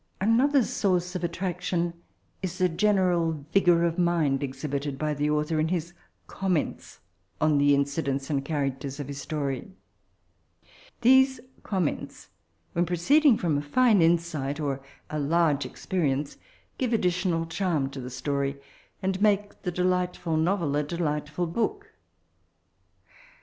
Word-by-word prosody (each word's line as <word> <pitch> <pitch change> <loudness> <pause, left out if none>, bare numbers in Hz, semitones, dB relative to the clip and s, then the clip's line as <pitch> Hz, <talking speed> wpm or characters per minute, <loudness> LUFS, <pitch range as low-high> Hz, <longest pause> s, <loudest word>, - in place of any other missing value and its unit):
Another 250 +7 +4
source 180 -4 0
of 180 - -3
attraction 175 0 -2 0.5
is 185 -1 -4
the 185 - +3
general 175 -5 +1
vigour 175 -4 +4
of 170 +1 0
mind 165 -6 +2
exhibited 140 +1 -3
by 150 +1 -1
Xhe 145 +1 0
author, 150 +1 0
in 155 - +2
his 170 0 -2 0.3
comments 185 -5 -3 0.4
on 155 -2 +3
the 145 0 +5
incidents 140 -1 -1
and 140 -3 -1
characters 140 -2 -3
of 145 - -4
his 140 0 -6
story; 140 +3 -3 1.3
these 265 +1 +5 0.2
comments, 185 -7 -3 0.4
when 175 0 +1
proceeding 255 - +4
from 155 -5 0
a - - -3
fine 215 +7 +3
insight 165 -4 +1
or 140 -3 -2 0.3
a 150 - -2
large 150 -1 +2
expe 185 -2 -3
rience, 140 -1 -1 0.4
give 250 -3 0
additional 180 -4 +1
charm 165 -4 -1
to 135 - -7
the 125 - -6
story, 140 +2 -2 0.4
and 190 0 -1
make 205 -1 +1
the 180 - -2
delightful 180 -1 0
novel 165 -2 +1
a 150 - +1
delightftil 155 +1 -2
book. 410 - -2
165 Hz, 135 wpm, -27 LUFS, 145-185 Hz, 1.3 s, the